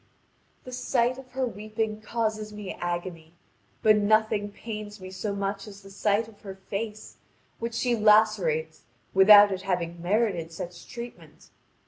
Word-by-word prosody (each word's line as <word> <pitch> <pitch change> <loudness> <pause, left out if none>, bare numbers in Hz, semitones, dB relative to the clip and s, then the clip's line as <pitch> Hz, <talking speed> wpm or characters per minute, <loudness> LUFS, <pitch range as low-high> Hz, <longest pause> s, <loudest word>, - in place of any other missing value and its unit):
The 255 - -9
sight 250 0 0
of 255 -2 -14
her 260 0 0
weeping 215 -1 -4
causes 215 -1 -2
me 210 -2 -6
agony, 175 -2 -5 0.5
but 215 -1 +6
nothing 210 0 +2
pains 210 -1 -7
me 185 0 -9
so 200 +2 -3
much 200 +1 -3
as 200 -1 -12
the 195 - -13
sight 205 +2 +1
of 220 -2 -17
her 195 -2 -8
face, 210 +3 -6 0.4
which 230 0 -4
she 245 0 +1
lacerates 210 -8 +3 0.3
without 205 +1 +8
its 190 -1 -3
having 175 -3 -2
merited 180 -3 0
such 170 +1 -8
treatment. 240 0 -10
210 Hz, 145 wpm, -27 LUFS, 190-220 Hz, 0.5 s, without